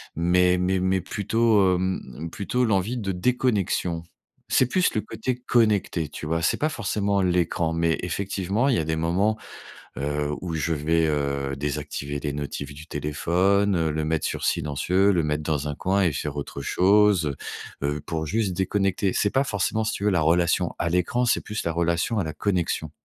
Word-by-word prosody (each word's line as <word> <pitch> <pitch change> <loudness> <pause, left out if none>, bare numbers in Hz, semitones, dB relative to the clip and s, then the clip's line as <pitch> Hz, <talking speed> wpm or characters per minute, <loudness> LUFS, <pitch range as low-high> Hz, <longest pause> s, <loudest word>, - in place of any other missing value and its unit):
mais 90 +2 +3
mais 90 +1 +1
mais 95 0 +1
plutôt 105 0 +2
hem, 95 +1 -1
mmh 70 +6 -8
plutôt 115 +8 -1
l'envie 110 +3 0
de 100 -4 -2
déconnexion. 95 -5 0 0.5
C'est 130 - +4
plus 180 +8 +1
le 110 - +1
côté 115 +4 -3
connecté, 110 -9 +1
tu 75 - -8
vois? 80 +2 0
C'est - - +2
pas 155 - 0
forcément 100 -5 0
l'écran. 85 -2 +1
Mais 85 0 +1
effectivement, 100 +6 -1
il 130 - +3
y - - +2
a 80 - -1
des 80 +1 -1
moments, 90 +7 +1 0.6
heu, 75 +1 -1
où 85 -3 -4
je 80 +2 0
vais, 80 +2 +1
heu, 70 -2 -1
désactiver 75 0 -4
des 75 0 -3
notifications 70 0 -5
du 75 +3 -11
téléphone, 90 +6 +1
heu, 80 -1 +1
le 80 +1 -2
mettre 80 +1 0
sur - - -4
silencieux. 90 +7 +2
Le 85 -3 +1
mettre 75 0 -1
dans 75 -1 -1
un 75 - -4
coin 95 +5 +1
et 90 -4 +3
faire 75 +1 -4
autre 70 -1 -5
chose, 100 0 +4 0.5
heu, 70 - 0
heu, 75 - -5
pour 80 0 -3
juste 105 +4 0
déconnecter. 95 0 0
C'est 105 - +2
pas 135 +5 +1
forcément, 110 0 -1
si - - -1
tu - - -5
veux, 105 - +3
la 90 - +2
relation 85 +2 +2
à 85 - 0
l'écran, 90 +8 +1
c'est 120 - +2
plus 105 +1 -4
la 85 - -1
relation 85 +6 0
à 95 - -1
la 80 - -4
connexion. 85 -6 -1
90 Hz, 195 wpm, -25 LUFS, 80-100 Hz, 0.6 s, C'est